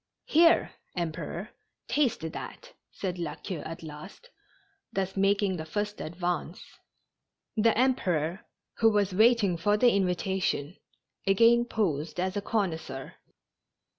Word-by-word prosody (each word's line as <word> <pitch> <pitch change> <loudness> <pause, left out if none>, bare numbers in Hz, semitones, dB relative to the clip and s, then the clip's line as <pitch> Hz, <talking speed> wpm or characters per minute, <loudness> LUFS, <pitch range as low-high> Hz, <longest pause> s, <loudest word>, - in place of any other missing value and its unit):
" - - -58
Here, 330 +2 +5 0.2
Emperor, 170 +3 -4 0.4
taste 280 -5 +1
that," - - -8 0.2
said 185 -2 -4
La 170 - -3
Queue 185 -6 -6
at 165 +2 -7
last, 160 - -10 0.6
thus 190 0 -2
making 195 -1 +2
the 155 - -4
first 205 +5 -3
advance. 175 +1 -3 1.0
The 225 0 +3
Emperor, 185 - +1 0.4
who 225 - +6
was 205 -2 +1
waiting 215 -3 +4
for 205 +5 +2
the 245 +2 +5
invitation, 185 -4 0 0.5
again 230 +4 +5
posed 160 -9 -1
as 185 +2 -1
a 205 - -1
connoisseur. 160 - -3
190 Hz, 120 wpm, -28 LUFS, 170-215 Hz, 1.0 s, who